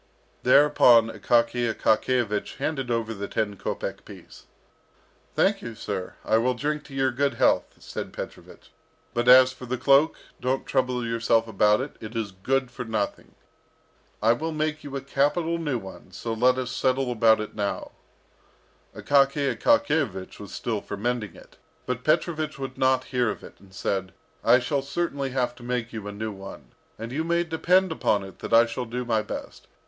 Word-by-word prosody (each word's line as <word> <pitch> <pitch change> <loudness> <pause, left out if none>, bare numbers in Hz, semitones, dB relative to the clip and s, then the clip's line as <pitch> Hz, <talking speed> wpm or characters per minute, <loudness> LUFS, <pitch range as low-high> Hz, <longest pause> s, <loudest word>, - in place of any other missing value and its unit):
Thereupon 125 -4 +6
Akaky 115 +2 +1
Akakiyevich 110 -1 0
handed 135 -5 -2
over 115 -1 -1
the 100 -1 -5
ten 105 -2 -2
kopek - - -4
piece. - - -14 0.9
"Thank - - +2
you, 115 -1 -7
sir. 95 -4 -5
I 110 - +3
will 125 +2 +1
drink 150 +4 -3
your 135 -1 0
good 140 +3 0
health," - - +2
said - - -7
Petrovich. - - -10 0.4
"But 120 0 -1
as 130 +1 +8
for 130 -1 -10
the 130 +1 -2
cloak, 140 +5 +4 0.2
don't 130 +1 -1
trouble 125 -2 0
yourself 115 0 +1
about 105 +1 +3
it; 140 - -7
it 110 +1 -9
is 110 -3 -2
good 130 +7 -1
for 125 - -6
nothing. 110 -3 -3 0.9
I 115 +1 +6
will 160 +7 -3
make 155 0 -2
you 140 -1 -7
a 135 - -3
capital 150 +5 0
new 145 -6 -1
one, 95 -4 -11
so 115 - -4
let 125 +3 +3
us 130 -1 -3
settle 130 -1 0
about 110 -2 +4
it 105 - -5
now." 100 -1 -3 1.0
Akaky 140 0 +2
Akakiyevich 160 - +1
was 100 -2 -9
still 110 -4 -3
for 100 - -6
mending 110 -3 -2
it, - - -17 0.3
but 125 -1 -3
Petrovich 155 0 0
would 135 -1 -6
not 130 0 +2
hear 125 -2 +2
of - - -5
it, - - -13
and 100 -1 -19
said, 95 0 -3 0.3
"I 120 +2 +6
shall 135 +3 -1
certainly 140 -1 -2
have 130 -1 -1
to - - -14
make 120 -1 -3
you 110 -2 -6
a - - -4
new 110 +2 -4
one, 95 -1 -10 0.3
and 115 +2 -7
you 150 +5 -1
may 170 +1 +1
depend 180 +3 +2
upon 105 -10 +1
it 95 -1 -11
that - - -7
I 115 +1 +7
shall 120 +2 -4
do 125 +2 -4
my 110 -2 +1
best. 105 - -8
125 Hz, 175 wpm, -25 LUFS, 110-140 Hz, 1.0 s, as